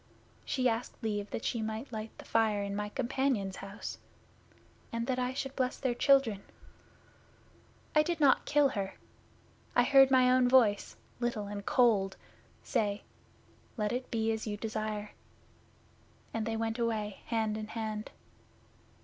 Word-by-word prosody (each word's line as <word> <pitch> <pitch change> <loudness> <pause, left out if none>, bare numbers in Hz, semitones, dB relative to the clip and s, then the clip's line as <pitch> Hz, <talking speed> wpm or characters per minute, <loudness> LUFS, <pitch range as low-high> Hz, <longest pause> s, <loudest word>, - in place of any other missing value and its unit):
She 255 -2 +1
asked 230 +1 -2
leave 205 -2 -2
that - - -5
she 230 - -1
might 220 +4 -4
light 215 0 -4
the - - -11
fire 215 -3 +2
in 200 0 -3
my 210 0 -2
companion's 235 -5 -1
house 195 +1 -7 0.9
and 230 0 -2
that 255 0 -1
I 250 0 0
should 270 0 -4
bless 255 -1 0
their 255 -3 0
children. 240 -6 +3 1.5
I 305 - +7
did 335 +1 -1
not 280 -3 +4
kill 295 -1 +4
her. 200 -6 -3 0.8
I 245 - +6
heard 270 +1 +7
my 255 -1 +5
own 255 -1 +4
voice, 230 -6 +4 0.2
little 240 -4 -1
and 200 0 -6
cold, 210 -7 +3 0.5
say, 205 -1 -1 0.7
"Let 210 -1 0
it 250 +1 -3
be 225 -1 0
as 220 0 -3
you 205 -1 -3
desire," 215 -1 -3 1.2
and 225 -1 -2
they 225 0 -1
went 225 +1 -2
away 215 -3 -1
hand 220 -2 0
in 215 0 -5
hand. 215 -1 -4
225 Hz, 150 wpm, -31 LUFS, 210-250 Hz, 1.5 s, I